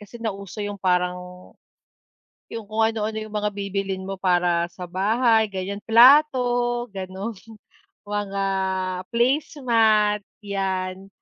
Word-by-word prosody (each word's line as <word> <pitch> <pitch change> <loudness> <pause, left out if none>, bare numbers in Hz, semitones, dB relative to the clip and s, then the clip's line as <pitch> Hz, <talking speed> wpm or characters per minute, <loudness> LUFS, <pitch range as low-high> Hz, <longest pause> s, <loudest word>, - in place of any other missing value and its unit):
kasi 210 +3 -12
nauso 200 -2 -6
yung 205 0 -3
parang 180 -1 +1 1.3
yung 225 -2 -6
kung 215 +2 -2
ano-ano 220 -1 -3
yung 215 -1 -8
mga 210 0 -1
bibilhin 195 -1 -3
mo 195 -1 -5
para 175 -2 +2
sa 180 -2 -8
bahay 220 +4 +2
gan'yan, 195 0 -5
plato 245 -1 +4
gano'n, 195 +2 -6 0.7
mga 205 -1 -3 0.7
placemat, 230 -5 +2 0.2
'yan. 190 -1 -3
205 Hz, 105 wpm, -23 LUFS, 190-230 Hz, 1.3 s, plato